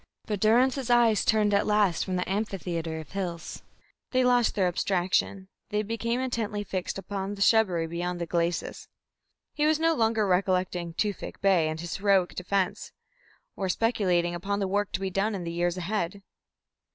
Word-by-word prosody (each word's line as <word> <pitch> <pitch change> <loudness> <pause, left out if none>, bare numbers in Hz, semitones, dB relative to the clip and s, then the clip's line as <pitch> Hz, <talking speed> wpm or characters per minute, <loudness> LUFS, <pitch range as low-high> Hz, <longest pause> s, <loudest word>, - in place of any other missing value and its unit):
But 210 -2 -2
Durrance's 250 +4 +3
eyes 235 -3 +4
turned 215 -2 +2
at 200 - +2
last 210 -5 +2
from 185 - -2
the 180 - -1
amphitheatre 175 -5 -3
of 155 - -14
hills; 180 -4 -5 0.5
they 255 -1 +2
lost 245 -2 +3
their 195 -3 +2
abstraction, 185 +1 0 0.2
they 210 +1 0
became 230 +3 -2
intently 225 -5 -2
fixed 185 -2 -4
upon 195 0 -4
the 200 - -9
shrubbery 190 -8 +3
beyond 175 +2 -3
the 170 - -2
glacis. 170 +1 -2 0.7
He 300 0 +1
was 310 0 +2
no 330 0 +3
longer 225 -5 +1
recollecting 180 -2 0
Tewfik 205 -1 -3
Bey 185 -5 +3
and 155 0 -4
his 175 +1 -4
heroic 195 -2 +2
defence, 185 +1 -2 0.6
or 190 -1 -2
speculating 180 -5 +1
upon 195 +4 -2
the 200 -1 -1
work 205 +1 -1
to - - -1
be 190 -1 -3
done 200 +3 0
in 185 - -4
the 170 - -4
years 175 +1 0
ahead. 190 +1 -3
195 Hz, 170 wpm, -27 LUFS, 175-215 Hz, 0.7 s, eyes